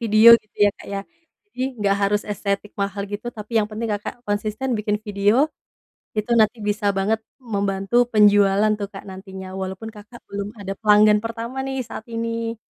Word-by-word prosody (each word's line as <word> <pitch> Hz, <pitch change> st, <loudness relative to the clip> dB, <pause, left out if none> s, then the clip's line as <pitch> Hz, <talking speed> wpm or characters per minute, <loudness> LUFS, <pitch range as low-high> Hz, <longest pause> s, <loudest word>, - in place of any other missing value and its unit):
video, 220 Hz, 0 st, +6 dB
gitu, 215 Hz, -, -37 dB
ya -, -, +4 dB
Kak, -, -, -13 dB
ya. 200 Hz, -, -2 dB, 0.5 s
Jadi, 255 Hz, -, -11 dB, 0.2 s
nggak 200 Hz, -1 st, +2 dB
harus 205 Hz, +1 st, +2 dB
estetik 200 Hz, 0 st, -2 dB
mahal 200 Hz, 0 st, -2 dB
gitu, 205 Hz, +3 st, -6 dB
tapi 215 Hz, +1 st, -5 dB
yang 215 Hz, -, +3 dB
penting 220 Hz, +2 st, -4 dB
Kakak 210 Hz, +4 st, -8 dB
konsisten 215 Hz, +5 st, -2 dB
bikin 210 Hz, 0 st, 0 dB
video, 210 Hz, +8 st, +3 dB, 0.7 s
itu 215 Hz, +1 st, -1 dB
nanti 215 Hz, +2 st, +3 dB
bisa 205 Hz, 0 st, -1 dB
banget 220 Hz, +3 st, +1 dB, 0.3 s
membantu 195 Hz, +1 st, -2 dB, 0.2 s
penjualan 205 Hz, 0 st, +5 dB
tuh, 200 Hz, -1 st, -4 dB
Kak, 195 Hz, -, -9 dB
nantinya. 190 Hz, 0 st, -9 dB
Walaupun 190 Hz, +4 st, -5 dB
Kakak 210 Hz, +3 st, -13 dB
belum 200 Hz, 0 st, -4 dB
ada 195 Hz, 0 st, -4 dB
pelanggan 210 Hz, -1 st, +5 dB
pertama, 230 Hz, +3 st, -4 dB
nih, 270 Hz, 0 st, -3 dB
saat 220 Hz, -, -8 dB
ini. 230 Hz, 0 st, -3 dB
210 Hz, 170 wpm, -22 LUFS, 200-225 Hz, 0.7 s, video